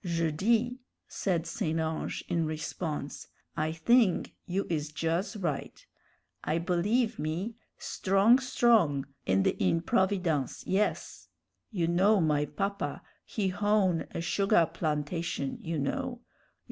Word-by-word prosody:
"Je 165 -3 0
dis," 225 +9 +2 0.4
said 175 -4 -1
St. 165 -1 -2
Ange, 160 0 -2
in 170 -2 0
response, 155 -1 -4 0.3
"I 155 +1 0
thing 210 +4 +3 0.2
you 190 +2 -1
is 150 -3 -2
juz 165 +7 -1
right. 165 -8 -4 0.6
I 155 - 0
believe, 205 +7 +1
me, 165 +9 -2 0.2
strong 200 +6 +3
strong 225 - +3 0.2
in 95 0 +3
the - - +2
improvidence, 170 - +1
yes. 200 +3 -1 0.4
You 180 -7 -1
know 190 +5 +4
my 150 -3 +2
papa 200 +5 -3 0.2
he 200 -4 -1
hown 200 -3 +1
a - - -4
sugah 175 0 +2
plantation, 150 -2 -2
you 165 0 -3
know. 245 - -2
175 Hz, 120 wpm, -29 LUFS, 155-205 Hz, 0.6 s, know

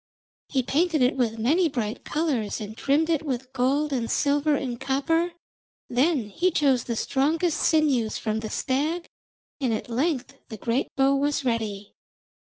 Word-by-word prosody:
He 265 -3 +1
painted 310 +2 +2
it 250 - +3
with 235 -4 0
many 315 +10 +2
bright 230 -5 -3
colours 280 -11 -1
and 215 0 -7
trimmed 285 +6 +2
it 320 -2 +1
with 260 -3 -4
gold 275 +4 +1
and 235 -3 -1
silver 290 +1 +2
and 250 -4 -3
copper. 325 +6 0 0.6
Then 255 -2 +2
he 350 - +1
chose 275 -7 +2
the 235 - -2
strongest 310 +8 +1
sinews 280 -9 +2
from 220 -1 -2
the 220 -1 -5
stag, 305 +9 -1 0.5
and 260 -4 0
at 220 +2 -3
length 265 +1 -1 0.2
the 220 - -7
great 235 +5 0
bow 270 +1 +3
was 285 0 0
ready. 215 -4 -2
270 Hz, 160 wpm, -25 LUFS, 235-305 Hz, 0.6 s, it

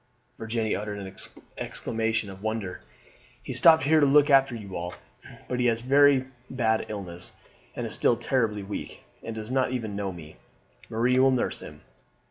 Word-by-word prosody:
Virginie 110 -1 -1
uttered 105 0 -4
an 95 -1 -8 0.4
exclamation 110 -2 -2
of 95 0 -12
wonder. 110 -4 -3 0.6
"He - - -5
stopped 160 -1 +6
here 155 +2 +4
to 145 - +5
look 145 +1 +5
after 135 -2 +5
you 100 -4 -8
all, 90 +1 -4 0.5
but 125 - -2
he 125 - +3
has 115 -1 +1
had - - -13
a - - -9
very 140 -1 +6 0.2
bad 110 -4 0
illness, 90 -4 -6 0.4
and - - -3
is - - -6
still - - +2
terribly 110 -6 0
weak, 100 +1 -7 0.2
and 115 - -6
does 110 +2 -6
not 130 -1 +1
even 110 -5 -3
know 100 -1 -2
me. 80 -3 -11 0.5
Marie 120 +3 +2
will 135 +1 +6
nurse 130 -2 0
him. 75 0 -11
110 Hz, 180 wpm, -27 LUFS, 100-130 Hz, 0.6 s, stopped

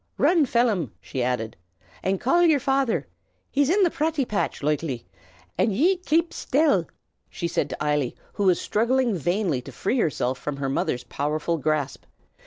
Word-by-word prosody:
Run, 330 -6 +4
Phelim," 220 - +1
she 130 - -5
added, 120 -3 -1 0.5
"an' 190 +1 0
call 305 - +2
yer 320 -4 +5
father. 265 - +1 0.5
He's 285 0 +2
in 390 +3 +4
the 345 - +3
praty 310 -3 0
patch, 210 - -2
loikely. 145 -4 -1 0.6
An' - - +4
ye 320 - +3
kape 335 -1 +1
shtill!" 275 - +2 0.4
she 170 - -3
said 170 - -1
to - - -5
Eily, 150 -4 0 0.2
who 205 - -1
was 180 -2 +4
struggling 235 +1 +1
vainly 175 -4 0
to - - -10
free 245 +6 -1
herself 130 - 0
from 145 +1 -4
her 140 -1 -2
mother's 125 -2 -1
powerful 155 +3 -2
grasp. 150 -1 -1
190 Hz, 165 wpm, -25 LUFS, -, 0.6 s, yer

